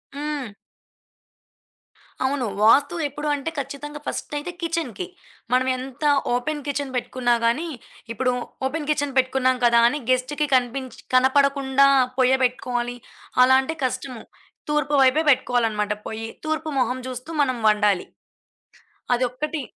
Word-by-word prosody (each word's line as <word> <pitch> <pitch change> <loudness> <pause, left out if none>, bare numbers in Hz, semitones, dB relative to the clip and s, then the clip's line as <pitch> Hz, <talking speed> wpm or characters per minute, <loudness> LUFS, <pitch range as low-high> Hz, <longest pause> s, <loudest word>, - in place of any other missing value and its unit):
హ్మ్. 290 -5 -4 1.7
అవును. 265 -1 0 0.2
వాస్తు 280 +9 +5
ఎప్పుడు 295 +2 -6
అంటే 285 +3 -4
ఖచ్చితంగా 285 +2 -6
ఫస్టయితే 295 +4 -4
కిచెన్‌కి. 325 - -3 0.5
మనం 255 +1 +3
ఎంత 260 +2 -8 0.3
ఓపెన్ 295 +4 -2
కిచెన్ 280 -1 -3
పెట్టుకున్నా 245 0 0
గానీ 270 +9 +1 0.5
ఇప్పుడు 250 +1 0 0.3
ఓపెన్ 300 +1 -4
కిచెన్ 290 -2 0
పెట్టుకున్నాం 255 0 +2
కదా 235 0 +5
అని 295 +5 -1
గెస్ట్‌కి 260 +4 +1
కనిపించి 255 0 -1 0.2
కనపడకుండా 275 +1 +4 0.3
పొయ్య 260 0 +4
పెట్టుకోవాలి 245 -1 -1 0.5
అలా 260 +1 +6
అంటే 320 +5 -4
కష్టము. 255 -2 -4 0.5
తూర్పు 295 -1 +1
వైపే 265 +4 +4
పెట్టుకోవాలనమాట 225 -5 +1
పొయ్యి. 225 0 -5 0.2
తూర్పు 315 0 -2
మొహం 255 0 0
చూస్తూ 255 +3 -7
మనం 255 -3 +1
వండాలి. 210 -3 +2 1.1
అదొక్కటి 255 +5 -1
260 Hz, 115 wpm, -23 LUFS, 250-290 Hz, 1.7 s, అలా